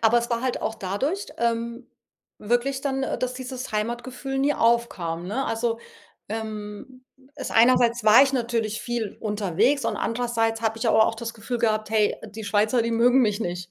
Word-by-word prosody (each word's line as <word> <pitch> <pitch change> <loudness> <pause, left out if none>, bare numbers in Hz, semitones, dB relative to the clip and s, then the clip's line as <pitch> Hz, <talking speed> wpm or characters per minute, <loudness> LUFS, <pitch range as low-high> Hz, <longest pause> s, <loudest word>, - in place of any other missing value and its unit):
Aber 230 +1 +5
es 235 +1 -4
war 235 0 0
halt 255 -1 -1
auch 220 - -1
dadurch, 260 - -2
ähm 235 +1 -1 0.5
wirklich 245 +5 0
dann, 270 -1 -1
äh, - - -2
dass 255 0 -2
dieses 255 0 -6
Heimatgefühl 240 +5 -3
nie 285 +2 +2
aufkam, 185 -8 0
ne? 260 +7 -1
Also, 230 0 -1 0.5
ähm, 220 +3 -7 0.3
es 275 - -5
einerseits 235 0 +4
war 215 +4 +8
ich 275 - -2
natürlich 230 -4 -1
viel 235 -4 -3
unterwegs 210 - +1
und - - -1
andererseits 230 -1 -1
habe 225 -1 0
ich - - 0
aber 220 0 +5
auch - - -1
das 230 0 -5
Gefühl 235 +2 -4
gehabt: 215 -2 0
„Hey, 215 -2 +2
die 220 +1 -9
Schweizer, 215 +4 +2
die 230 - -1
mögen 245 +3 +4
mich 210 -3 +1
nicht.“ 175 -2 -4
230 Hz, 180 wpm, -24 LUFS, 215-250 Hz, 0.5 s, war